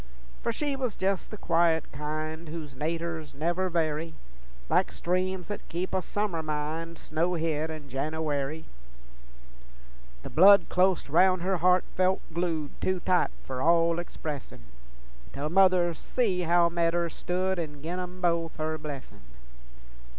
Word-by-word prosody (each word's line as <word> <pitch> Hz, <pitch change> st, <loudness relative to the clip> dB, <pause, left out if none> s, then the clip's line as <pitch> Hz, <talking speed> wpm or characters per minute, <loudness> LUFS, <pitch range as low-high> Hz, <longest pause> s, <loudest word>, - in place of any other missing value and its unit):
For -, -, 0 dB
she 285 Hz, +4 st, -2 dB
was 255 Hz, -6 st, -3 dB
jes' 190 Hz, 0 st, 0 dB
the 215 Hz, -, -8 dB
quiet 165 Hz, -4 st, +2 dB
kind 155 Hz, +2 st, -4 dB
Whose 155 Hz, -3 st, -6 dB
naturs 160 Hz, +2 st, -3 dB
never 175 Hz, +5 st, 0 dB
vary, 160 Hz, -1 st, -1 dB, 0.5 s
Like -, -, +2 dB
streams 185 Hz, +1 st, -1 dB
that 205 Hz, -, -6 dB
keep 180 Hz, +3 st, -3 dB
a 190 Hz, -, +2 dB
summer 200 Hz, -3 st, -2 dB
mind 155 Hz, +2 st, -3 dB
Snowhid 160 Hz, -1 st, -1 dB
in 155 Hz, -2 st, -7 dB
Jenooary. 150 Hz, +2 st, -2 dB, 1.6 s
The -, -, -6 dB
blood 200 Hz, +4 st, +7 dB
clost 185 Hz, 0 st, +2 dB
roun' 185 Hz, +4 st, +4 dB
her 190 Hz, +1 st, +1 dB
heart 180 Hz, +2 st, +4 dB
felt 185 Hz, +1 st, +2 dB
glued 165 Hz, -4 st, -1 dB
Too 185 Hz, -1 st, +1 dB
tight 180 Hz, 0 st, +2 dB, 0.2 s
for 130 Hz, -1 st, -4 dB
all 170 Hz, +2 st, +4 dB
expressin', 150 Hz, -, -6 dB, 0.7 s
Tell 150 Hz, +2 st, -3 dB
mother 180 Hz, -2 st, +5 dB
see 190 Hz, +1 st, -1 dB
how 175 Hz, 0 st, +5 dB
metters 170 Hz, 0 st, 0 dB
stood, 185 Hz, +1 st, -1 dB
An' 150 Hz, -3 st, -5 dB
gin 175 Hz, +3 st, -3 dB
'em 180 Hz, 0 st, -6 dB
both 170 Hz, -2 st, +1 dB
her 155 Hz, 0 st, -2 dB
blessin'. 135 Hz, -9 st, -8 dB
170 Hz, 135 wpm, -28 LUFS, 155-185 Hz, 1.6 s, blood